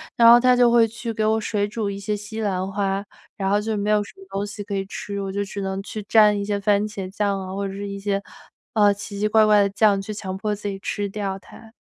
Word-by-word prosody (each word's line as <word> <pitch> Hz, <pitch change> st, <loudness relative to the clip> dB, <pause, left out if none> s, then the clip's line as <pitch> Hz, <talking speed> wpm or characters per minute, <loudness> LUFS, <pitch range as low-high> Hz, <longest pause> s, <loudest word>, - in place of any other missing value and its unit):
然 230 Hz, -, +6 dB
后 235 Hz, +1 st, +9 dB
她 250 Hz, 0 st, +4 dB
就 245 Hz, -1 st, +5 dB
会 235 Hz, -1 st, +5 dB
去 230 Hz, +1 st, -6 dB
给 220 Hz, -, -1 dB
我 220 Hz, +1 st, +2 dB
水 205 Hz, -1 st, -1 dB
煮 210 Hz, 0 st, -3 dB
一 200 Hz, 0 st, -4 dB
些 210 Hz, +1 st, -2 dB
西 220 Hz, +2 st, -7 dB
兰 190 Hz, -2 st, -1 dB
花， 195 Hz, 0 st, -1 dB, 0.3 s
然 195 Hz, -, -2 dB
后 205 Hz, +2 st, +2 dB
就 220 Hz, 0 st, -2 dB
没 205 Hz, +1 st, 0 dB
有 210 Hz, -1 st, +3 dB
什 -, -, -12 dB
么 385 Hz, -, -14 dB
东 200 Hz, +1 st, -2 dB
西 205 Hz, 0 st, -7 dB
可 205 Hz, 0 st, -6 dB
以 195 Hz, -, -1 dB
吃， 200 Hz, 0 st, -5 dB
我 195 Hz, -1 st, -4 dB
就 200 Hz, +1 st, -1 dB
只 200 Hz, +1 st, -6 dB
能 190 Hz, 0 st, -3 dB
去 215 Hz, +1 st, -6 dB
沾 210 Hz, -2 st, +6 dB
一 -, -, -2 dB
些 200 Hz, 0 st, -1 dB
番 200 Hz, 0 st, +2 dB
茄 200 Hz, -3 st, -6 dB
酱 200 Hz, -2 st, 0 dB
啊， 190 Hz, 0 st, -6 dB
或 200 Hz, +1 st, -2 dB
者 195 Hz, -, -6 dB
是 200 Hz, +1 st, -5 dB
一 200 Hz, 0 st, -5 dB
些， 200 Hz, 0 st, -1 dB, 0.5 s
呃， 205 Hz, -2 st, +5 dB
奇 200 Hz, 0 st, -8 dB
奇 210 Hz, -, +2 dB
怪 220 Hz, 0 st, +5 dB
怪 210 Hz, -1 st, +5 dB
的 200 Hz, -, +2 dB
酱， 200 Hz, 0 st, +3 dB
去 215 Hz, +2 st, -6 dB
强 190 Hz, -3 st, -5 dB
迫 210 Hz, +1 st, -2 dB
自 205 Hz, 0 st, -5 dB
己 195 Hz, -1 st, -3 dB
吃 205 Hz, +1 st, -3 dB
掉 195 Hz, -1 st, -4 dB
它。 220 Hz, +3 st, -15 dB
205 Hz, 300 characters per minute, -23 LUFS, 195-215 Hz, 0.5 s, 后